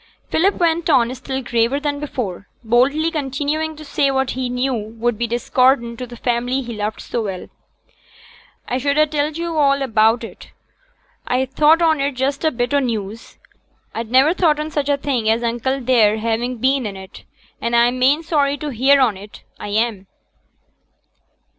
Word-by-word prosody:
Philip 385 +5 +2
went 340 0 0
on, 250 -4 +3
still 265 +1 -5
graver 240 +3 +1
than 290 -1 -2
before, 215 -10 -5 0.2
boldly 270 +8 +2
continuing 300 +2 -2
to 310 0 -11
say 280 -1 +1
what 265 -1 0
he 255 -1 -3
knew 250 +2 -1
would 225 +1 -2
be 235 +2 -2
discordant 240 0 +1
to 250 - -5
the 240 - -10
family 245 +3 -1
he 235 -1 -6
loved 210 0 -4
so 235 - -3
well. 195 -4 -5 1.2
'I 250 - -1
should 280 +2 0
ha' 305 - +5
telled 300 +1 -2
yo' 335 -1 -3
all 280 -2 +3
about 225 -1 +2
it; 225 - -10 0.8
I 255 +1 +1
thought 305 +5 +3
on 315 -3 +3
it 280 +1 0
just 270 +3 -2
as 315 - +4
a 240 - -15
bit 245 +3 -1
o' 285 - +4
news; 225 -4 -4 0.6
I'd 230 -1 -5
niver 265 +6 +4
thought 320 -5 +2
on 305 +1 -4
such 290 -1 -2
a 285 - +2
thing 260 -6 -1
as 225 +2 +1
uncle 240 +3 -1
there 230 -4 +3
having 230 +3 -2
been 260 0 +1
in 195 -2 -7
it, 190 0 -12 0.4
and 235 0 -1
I'm 240 +2 +3
main 280 +5 +3
sorry 290 -3 +1
to 295 +1 -5
hear 275 +3 +3
on 235 -7 +2
it, 205 +2 -13 0.2
I - - -6
am.' 210 -2 -1
255 Hz, 185 wpm, -19 LUFS, 235-285 Hz, 1.2 s, ha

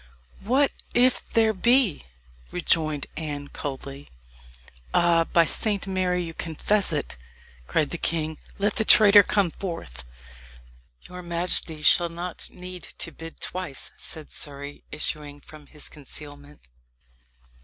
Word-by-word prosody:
"What 265 +7 +2 0.2
if 250 +1 +3
there 220 -1 +3
be?" 235 - +3 0.4
rejoined 155 -4 +1
Anne 145 -3 -5
coldly. 140 0 -7 0.9
"Ah! 170 -1 +4
by 170 0 +4
Saint 205 +3 +1
Mary, 185 -2 0
you 165 -1 -6
confess 185 +5 0
it!" 145 - -3 0.5
cried 150 -3 +1
the 170 - -3
king. 160 -1 -1 0.2
"Let 205 +5 0
the 220 - +2
traitor 205 -1 +8
come 200 -3 +1
forth." 165 - -6 1.0
"Your 180 0 -8
majesty 170 -2 0
shall 170 +3 +5
not 170 +1 -6
need 180 0 -8
to - - -5
bid 165 0 -11
twice," 180 -8 -2
said 155 -2 -4
Surrey, 140 0 -6
issuing 150 -1 -2
from 150 0 -14
his 150 0 -3
concealment. 145 - -10
165 Hz, 120 wpm, -25 LUFS, 150-185 Hz, 1.0 s, traitor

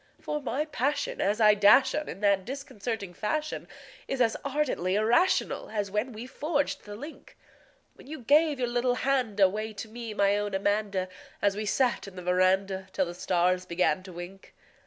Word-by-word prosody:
For 300 0 -3
my 285 +2 -2
passion 290 -1 -1
as 205 +3 +1
I 210 -1 +7
dash 210 +6 +6
on 300 0 -2
in 195 - -8
that 200 -2 +3
disconcerting 225 -6 -5
fashion 305 - -3 0.4
Is 270 - -3
as 230 -3 +3
ardently 275 -10 0
irrational 235 - +2
as 205 -2 -3
when 210 +5 -1
we 225 +1 -8
forged 290 +2 -2
the 205 0 -8
link 295 +9 -11 0.6
When - - -17
you 310 -1 -7
gave 295 +4 +4
your 250 -1 -1
little 245 +1 +1
hand 250 -6 0
away 210 +3 +2
to 210 +2 -7
me, 225 -1 -7
my 200 0 +3
own 205 -1 -2
Amanda 200 -1 0 0.3
An 205 - +3
we 210 +1 -4
sat 245 +1 +1
'n 195 - -11
the 180 - -8
veranda 190 +1 +1
till 190 - +1
the 175 - -6
stars 180 0 0
began 180 +2 +1
to 185 0 -11
wink. 175 +3 -10
210 Hz, 180 wpm, -28 LUFS, 195-260 Hz, 0.6 s, I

